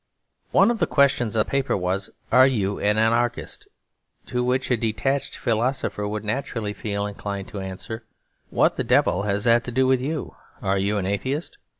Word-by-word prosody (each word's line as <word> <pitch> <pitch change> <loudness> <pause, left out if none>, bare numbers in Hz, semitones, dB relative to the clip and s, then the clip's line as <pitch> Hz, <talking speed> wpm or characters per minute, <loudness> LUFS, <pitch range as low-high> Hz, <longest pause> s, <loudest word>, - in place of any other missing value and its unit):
One 200 +4 +5
of 235 - -2
the - - +2
questions 130 -6 +2
on - - +5
the - - 0
paper 135 -4 0
was, 95 +1 -1 0.2
'Are 130 +2 +7
you 100 -6 0
an 105 +1 +2
anarchist?' 115 +2 0 0.6
To 125 -1 -1
which 130 +1 0
a - - +5
detached 115 +5 -1
philosopher 115 -2 -1
would 105 +1 -4
naturally 110 -2 -2
feel 100 -1 -3
inclined 100 -1 -5
to 105 - -6
answer, 95 +4 -6 0.5
'What - - +2
the - - 0
devil 90 - +3
has 100 0 -1
that 120 +1 +4
to 125 - -4
do 130 +2 +2
with 130 -1 +3
you? 150 +3 -4 0.2
Are 95 0 0
you 100 +2 0
an 95 - -1
atheist?' 130 - -2
110 Hz, 185 wpm, -24 LUFS, 100-130 Hz, 0.6 s, Are